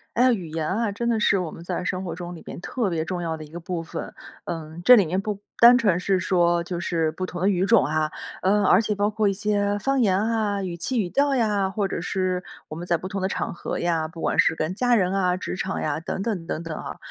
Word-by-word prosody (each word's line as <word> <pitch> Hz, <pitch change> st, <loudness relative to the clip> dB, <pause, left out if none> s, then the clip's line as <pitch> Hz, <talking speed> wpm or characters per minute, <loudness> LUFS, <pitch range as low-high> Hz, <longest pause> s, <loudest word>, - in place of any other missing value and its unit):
哎 245 Hz, -, +3 dB
呀， 255 Hz, -, +5 dB
语 185 Hz, -7 st, -3 dB
言 155 Hz, 0 st, -3 dB
啊， 215 Hz, +5 st, 0 dB
真 235 Hz, +4 st, -3 dB
的 230 Hz, -2 st, +1 dB
是 205 Hz, -1 st, +3 dB
我 175 Hz, -3 st, -3 dB
们 165 Hz, -, -10 dB
在 175 Hz, -, -3 dB
生 185 Hz, -1 st, -2 dB
活 170 Hz, -3 st, -4 dB
中 175 Hz, +1 st, -7 dB
里 165 Hz, -, -11 dB
边 -, -, -8 dB
特 220 Hz, +1 st, -2 dB
别 160 Hz, -2 st, -1 dB
重 175 Hz, +1 st, -3 dB
要 165 Hz, -1 st, -2 dB
的 155 Hz, -, -8 dB
一 150 Hz, -, -15 dB
个 170 Hz, +2 st, -7 dB
部 170 Hz, 0 st, -4 dB
分。 -, -, -6 dB, 0.3 s
嗯， 160 Hz, 0 st, -6 dB
这 250 Hz, -, +9 dB
里 200 Hz, -6 st, +4 dB
面 185 Hz, +4 st, 0 dB
不 205 Hz, 0 st, -3 dB, 0.2 s
单 240 Hz, +1 st, +9 dB
纯 195 Hz, -7 st, +2 dB
是 190 Hz, +1 st, +1 dB
说 175 Hz, -2 st, +2 dB
就 175 Hz, 0 st, -4 dB
是 165 Hz, -2 st, 0 dB
不 185 Hz, -, -4 dB
同 180 Hz, -1 st, -5 dB
的 190 Hz, -, +3 dB
语 185 Hz, -2 st, +2 dB
种 230 Hz, -1 st, +5 dB
啊， 155 Hz, 0 st, 0 dB, 0.3 s
嗯， 205 Hz, +2 st, +3 dB
而 190 Hz, +2 st, +5 dB
且 210 Hz, -1 st, -1 dB
包 205 Hz, +1 st, +1 dB
括 215 Hz, -1 st, +1 dB
一 -, -, +2 dB
些 205 Hz, 0 st, 0 dB
方 270 Hz, +5 st, +1 dB
言 195 Hz, -5 st, +3 dB
啊， 215 Hz, -2 st, 0 dB
语 175 Hz, -2 st, -4 dB
气 245 Hz, +9 st, -2 dB
语 190 Hz, -, -1 dB
调 280 Hz, +7 st, +2 dB
呀， 205 Hz, -5 st, +1 dB
或 205 Hz, 0 st, -1 dB
者 190 Hz, -, -3 dB
是 185 Hz, 0 st, -1 dB, 0.3 s
我 -, -, -6 dB
们 170 Hz, +2 st, -6 dB
在 175 Hz, -1 st, +1 dB
不 170 Hz, -, -7 dB
同 195 Hz, +1 st, -4 dB
的 190 Hz, -, +1 dB
场 -, -, -3 dB
合 -, -, -4 dB
呀， 165 Hz, -2 st, 0 dB
不 165 Hz, +1 st, -11 dB
管 -, -, -1 dB
是 160 Hz, -, +2 dB
跟 160 Hz, +4 st, -2 dB
家 245 Hz, +3 st, +3 dB
人 185 Hz, -3 st, +1 dB
啊， 185 Hz, -2 st, +1 dB
职 -, -, -4 dB
场 190 Hz, +1 st, -3 dB
呀 150 Hz, 0 st, -1 dB
等 170 Hz, -, -4 dB
等 200 Hz, -7 st, -3 dB
等 160 Hz, -, -3 dB
等 160 Hz, -2 st, -5 dB
啊。 -, -, -6 dB
185 Hz, 295 characters per minute, -24 LUFS, 170-205 Hz, 0.3 s, 这